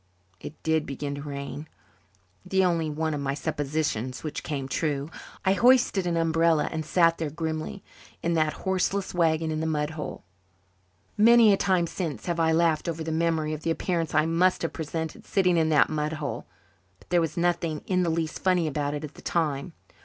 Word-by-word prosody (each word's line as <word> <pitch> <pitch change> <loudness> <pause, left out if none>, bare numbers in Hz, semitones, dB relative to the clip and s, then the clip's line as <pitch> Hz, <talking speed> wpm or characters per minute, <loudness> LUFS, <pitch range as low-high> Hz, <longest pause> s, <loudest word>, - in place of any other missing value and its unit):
It 155 - -8
did 160 -1 +1
begin 140 +1 -4
to 140 - -6
rain, 140 +1 -6 0.8
the 190 -1 +2
only 165 -3 +1
one 155 +1 -1
of 145 - -3
my 140 0 -1
suppositions 140 -4 -2
which 155 -2 -4
came 140 -3 -4
true. 145 +1 -2 0.3
I 190 - +4
hoisted 240 -4 +4
an 170 -1 0
umbrella 165 -1 +2
and 160 -1 -3
sat 165 +1 +3
there 160 -2 -1
grimly, 160 +4 -4 0.4
in 170 - +1
that 155 -2 +2
horseless 190 +1 0
wagon 160 -2 +1
in 155 - -2
the 160 - -1
mud 150 -1 -1
hole. 155 -2 -6 1.0
Many 230 -1 +7
a - - +5
time 185 -3 +2
since 160 - -4
have 170 -1 -1
I 160 0 +3
laughed 165 0 +2
over 165 -1 -3
the 160 - -3
memory 160 -1 0
of 155 - -5
the 165 - -2
appearance 165 -1 -1
I 155 0 +4
must 170 +3 +2
have 165 - -2
presented 160 0 -5
sitting 180 -3 +2
in 160 -1 +2
that 150 -2 +5
mud 155 0 -2
hole, 150 -3 -5 0.5
but - - -24
there 175 -1 +4
was 165 0 -3
nothing 170 -3 0
in 185 -1 +1
the 175 - +1
least 160 -1 -2
funny 180 -3 +2
about 145 -1 -1
it 145 - -5
at 150 - -7
the - - -14
time. 155 -1 -1
160 Hz, 195 wpm, -26 LUFS, 150-170 Hz, 1.0 s, Many